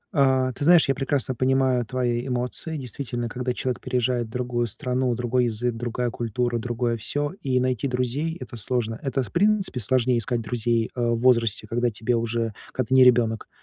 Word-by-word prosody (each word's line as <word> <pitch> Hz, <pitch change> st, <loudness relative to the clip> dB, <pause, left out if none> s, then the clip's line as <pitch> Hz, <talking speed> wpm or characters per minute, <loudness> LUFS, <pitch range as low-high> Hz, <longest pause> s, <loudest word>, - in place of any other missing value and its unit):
А, 130 Hz, -2 st, +3 dB
ты 145 Hz, -, -6 dB
знаешь, 170 Hz, -1 st, +6 dB
я 135 Hz, -, +3 dB
прекрасно 135 Hz, -1 st, 0 dB
понимаю 130 Hz, -1 st, +2 dB
твои 125 Hz, 0 st, -1 dB
эмоции. 125 Hz, +6 st, -2 dB
Действительно, 120 Hz, -2 st, -4 dB
когда 125 Hz, +1 st, -2 dB
человек 130 Hz, 0 st, -2 dB
переезжает 125 Hz, -1 st, 0 dB
в -, -, -15 dB
другую 120 Hz, 0 st, -2 dB
страну: 125 Hz, +2 st, -1 dB
другой 125 Hz, +1 st, +1 dB
язык, 120 Hz, +1 st, -1 dB
другая 120 Hz, +1 st, -2 dB
культура, 120 Hz, +1 st, -1 dB
другое 120 Hz, 0 st, -1 dB
всё, 145 Hz, +8 st, -1 dB
и 130 Hz, -2 st, +1 dB
найти 130 Hz, +1 st, 0 dB
друзей- 130 Hz, +6 st, -2 dB
это 120 Hz, -, -8 dB
сложно. 115 Hz, +1 st, -2 dB
Это, 135 Hz, -2 st, -1 dB
в -, -, -11 dB
принципе, 200 Hz, -7 st, +2 dB
сложнее 125 Hz, +2 st, +2 dB
искать 115 Hz, +1 st, -1 dB
друзей, 115 Hz, 0 st, -1 dB
э, 125 Hz, -, -2 dB
в 120 Hz, -1 st, +1 dB
возрасте, 115 Hz, -3 st, +2 dB
когда 120 Hz, +2 st, 0 dB
тебе 115 Hz, +2 st, -1 dB
уже 115 Hz, -1 st, -1 dB, 0.2 s
когда 130 Hz, -4 st, -2 dB
ты -, -, +1 dB
не 130 Hz, -, +8 dB
ребенок. 115 Hz, -3 st, +3 dB
125 Hz, 185 wpm, -24 LUFS, 115-130 Hz, 0.2 s, не